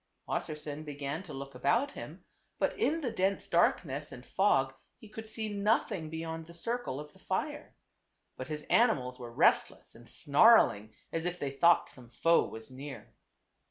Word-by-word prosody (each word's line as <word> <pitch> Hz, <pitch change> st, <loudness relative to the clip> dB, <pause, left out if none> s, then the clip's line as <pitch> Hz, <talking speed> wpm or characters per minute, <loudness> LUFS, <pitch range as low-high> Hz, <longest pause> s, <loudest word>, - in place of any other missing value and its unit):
Wassersein 150 Hz, 0 st, -4 dB
began 145 Hz, +1 st, -4 dB
to 180 Hz, -, -11 dB
look 135 Hz, 0 st, -7 dB
about 235 Hz, -, +1 dB
him, -, -, -9 dB, 0.3 s
but -, -, 0 dB
in 325 Hz, +3 st, +1 dB
the 250 Hz, -5 st, -2 dB
dense 195 Hz, -2 st, 0 dB
darkness 150 Hz, -4 st, +1 dB
and 125 Hz, 0 st, -10 dB
fog 135 Hz, -9 st, +2 dB, 0.2 s
he 220 Hz, -, -14 dB
could 220 Hz, +1 st, -9 dB
see 220 Hz, 0 st, -3 dB
nothing 200 Hz, -5 st, 0 dB
beyond 160 Hz, 0 st, -5 dB
the 170 Hz, -, -12 dB
circle 230 Hz, -, -3 dB
of 150 Hz, 0 st, -9 dB
the -, -, -20 dB
fire. -, -, -3 dB, 0.6 s
But 130 Hz, -, -6 dB
his 150 Hz, -1 st, -5 dB
animals 130 Hz, -, +2 dB
were 120 Hz, -1 st, -7 dB
restless -, -, +2 dB
and -, -, -15 dB
snarling 105 Hz, +1 st, +4 dB, 0.2 s
as 165 Hz, 0 st, -2 dB
if 180 Hz, 0 st, -2 dB
they 140 Hz, -5 st, -3 dB
thought 170 Hz, +5 st, +4 dB
some 125 Hz, -2 st, -14 dB
foe 165 Hz, +8 st, +3 dB
was 110 Hz, +3 st, -10 dB
near. 135 Hz, +2 st, -9 dB
155 Hz, 165 wpm, -31 LUFS, 135-195 Hz, 0.6 s, snarling